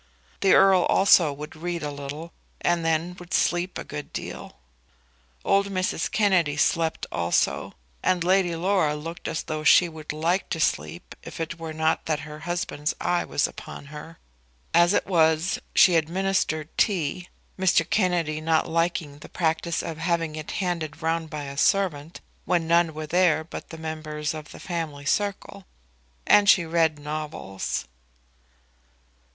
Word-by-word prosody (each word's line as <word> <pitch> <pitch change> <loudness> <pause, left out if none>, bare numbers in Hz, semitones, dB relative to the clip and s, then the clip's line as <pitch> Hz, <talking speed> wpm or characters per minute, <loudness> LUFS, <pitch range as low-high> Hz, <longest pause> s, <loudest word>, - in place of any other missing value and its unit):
The 195 - +4
Earl 190 -2 +5
also 180 -5 +5
would 150 +3 -8
read 170 0 -4
a 145 - -3
little, 145 +4 -7 0.3
and 175 -1 +1
then 165 +2 0
would 175 0 -3
sleep 175 +1 0
a - - -5
good 150 - -7
deal. - - -7 0.9
Old 200 0 +3
Mrs. 185 -3 -1
Kennedy 180 -8 +2
slept 160 +2 +1
also, 85 0 0 0.3
and 180 -2 +1
Lady 180 -1 +2
Laura 170 -3 +1
looked 165 +3 -7
as 160 - -3
though 155 -1 -4
she 175 +4 +6
would 160 -2 -7
like 170 +5 -1
to 165 - -2
sleep 165 +2 -2
if - - -10
it 165 +1 -4
were 165 -1 -5
not 160 +1 0
that 155 -2 0
her 150 0 -9
husband's 165 -2 -3
eye 175 0 +1
was 145 - 0
upon - - -10
her. 160 +2 -9 0.6
As 170 +1 +5
it - - +1
was, 160 -1 +2 0.2
she 180 - +7
administered 165 -1 0
tea, 180 -3 0 0.3
Mr. 180 -3 +3
Kennedy 175 -6 0
not 160 0 +1
liking 165 -3 -1
the - - -12
practice 165 0 -1
of 160 -1 -6
having 165 -2 -1
it 155 -1 -7
handed 170 -5 -3
round 165 0 -1
by 150 -1 -5
a 140 0 -7
servant 165 -2 0 0.2
when 170 -2 +1
none 170 -1 +3
were 155 0 -4
there 170 -1 +2
but 160 - -9
members 155 -1 -4
of 155 -2 -8
the - - -11
family 160 -5 -5
circle, 200 +1 -2 0.6
and 205 0 +5
she 175 -4 +6
read 160 -2 +1
novels. 150 - -4
165 Hz, 155 wpm, -25 LUFS, 155-175 Hz, 0.9 s, she